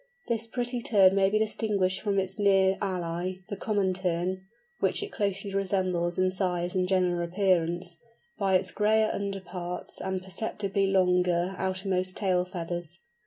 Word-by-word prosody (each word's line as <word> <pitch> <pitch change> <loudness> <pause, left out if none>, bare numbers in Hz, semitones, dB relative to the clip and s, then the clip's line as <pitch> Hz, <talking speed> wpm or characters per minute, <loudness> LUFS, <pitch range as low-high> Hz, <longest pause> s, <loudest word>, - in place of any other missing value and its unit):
This 230 -1 -1
pretty 245 +1 -1
Tern 195 -5 +5
may 195 -1 +4
be 215 - +2
distinguished 205 -3 0
from 200 -2 0
its 190 0 0
near 195 -1 +4
ally, 180 -2 -2 0.2
the 200 - -3
Common 200 -2 0
Tern 185 +1 -2 0.3
(which - - +1
it 410 - -6
closely 200 -1 -2
resembles 185 -3 0
in 185 0 +2
size 180 -2 -1
and 185 -1 +1
general 180 -2 +1
appearance), 175 -1 +1 0.4
by 195 -2 +2
its 185 0 +2
grayer 215 +1 +2
under 200 -1 -3
parts 180 -1 -6
and 190 0 -2
perceptibly 195 0 -2
longer 180 -1 +2
outermost 185 0 -2
tail 185 -3 +1
feathers. 175 -2 -5
190 Hz, 150 wpm, -28 LUFS, 180-200 Hz, 0.4 s, Tern